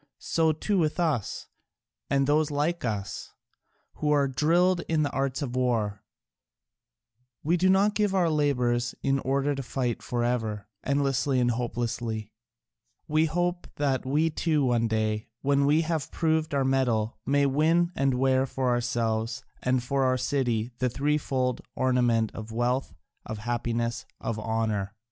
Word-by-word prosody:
So 160 -1 +1
too 190 +6 0
with 155 +1 0
us, 155 - -1 0.6
and 140 0 +2
those 150 +2 +2
like 150 +4 -1
us, 105 -5 -4 0.6
who 150 - -1
are 145 -2 +3
drilled 170 +7 +2
in 160 -2 +2
the 145 - -1
arts 135 +1 -1
of 125 -3 -4
war: 115 -5 0 1.4
we 165 +4 +2
do 185 +2 +3
not 200 +2 +4
give 210 -2 +1
our 180 -3 +3
labours 125 -5 +1
in 135 0 +2
order 140 +2 0
to 135 - -4
fight 125 -2 -2
for 120 -1 -2
ever, 110 -4 -1 0.2
endlessly 135 -1 +1
and 120 -1 +2
hopelessly, 115 -2 -3 0.8
we 155 +1 +3
hope 175 +2 -1
that 140 -3 0
we 150 +5 +1
too 150 -2 +1
one 120 -2 +2
day, 110 -1 -1 0.2
when 140 0 +3
we 150 +3 +4
have 160 -3 -2
proved 160 -2 0
our 135 -1 +2
mettle, 120 -5 +1
may 140 +2 +2
win 160 +5 +2
and 135 -1 +1
wear 130 +1 +2
for 130 -1 -1
ourselves 115 -2 -1 0.2
and 125 -1 +1
for 135 +2 0
our 130 0 +2
city 125 -3 0
the 130 -1 +1
threefold 135 -2 0
ornament 120 -4 +2
of 110 0 -7
wealth, 120 +3 0 0.4
of 110 - -4
happiness, 120 +1 -2
of 115 -2 -3
honour. 110 -2 -1
130 Hz, 150 wpm, -27 LUFS, 120-150 Hz, 1.4 s, not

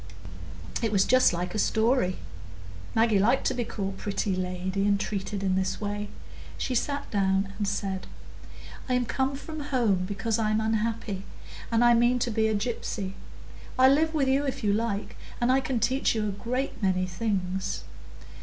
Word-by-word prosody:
It 225 -2 0
was 195 -2 +3
just 255 +1 +5
like 175 +1 -3
a 215 - -1
story; 220 -4 +2 0.8
Maggie 225 -2 +4
liked 235 +7 +3
to - - +2
be 245 -1 -1
called 195 -3 -4
pretty 200 -1 -1
lady 185 +2 -1
and 200 -1 +3
treated 200 -1 -3
in 190 -1 +1
this 190 0 -1
way. 205 0 -3 0.5
She 255 - -2
sat 280 +4 -1
down 195 -1 +1
and 205 - 0
said,— 195 -1 -2 0.8
"I'm 250 -1 +2
come 265 +4 0
from 310 +3 -7
home 235 -10 +1
because 210 +3 -1
I'm 215 -1 +2
unhappy, 220 -2 -1 0.5
and 230 +1 +4
I 240 - +7
mean 240 +1 +4
to 245 -1 -1
be 220 0 +2
a 220 - +1
gypsy. 205 -3 -3 0.6
I'll 260 +1 +7
live 320 +2 +2
with 275 -3 +2
you 270 +2 +3
if 270 -4 -3
you 205 -1 +3
like, 215 -1 -2 0.2
and 240 +1 +3
I 265 - +4
can 260 -2 -1
teach 255 +2 +1
you 215 -1 0
a - - -1
great 245 +7 -3
many 185 -2 +2
things." 185 -1 -2
215 Hz, 175 wpm, -27 LUFS, 195-245 Hz, 0.8 s, I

